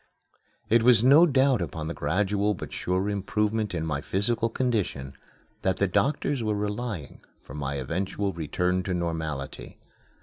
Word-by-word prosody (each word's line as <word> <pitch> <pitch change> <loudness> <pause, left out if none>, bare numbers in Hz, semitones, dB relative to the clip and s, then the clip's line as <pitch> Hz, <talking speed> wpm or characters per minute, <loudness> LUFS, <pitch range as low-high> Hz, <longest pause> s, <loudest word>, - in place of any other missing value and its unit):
It 115 +2 +4
was 120 -2 +5
no 145 +7 +7
doubt 135 - +3
upon 80 -2 -4
the 85 - -3
gradual, 100 +7 0
but - - -8
sure 90 +2 -1
improvement 105 +1 -1
in 80 -1 -2
my 75 -3 -2
physical 115 +7 0
condition 105 - -1 0.5
that 95 -1 0
the 100 - +2
doctors 140 +6 0
were 110 -2 0
relying 105 -5 -4 0.2
for - - -11
my 70 -1 -3
eventual 95 +8 -2
return 90 +3 -1
to 95 - -1
normality. 80 -5 -4
100 Hz, 145 wpm, -26 LUFS, 80-110 Hz, 0.5 s, no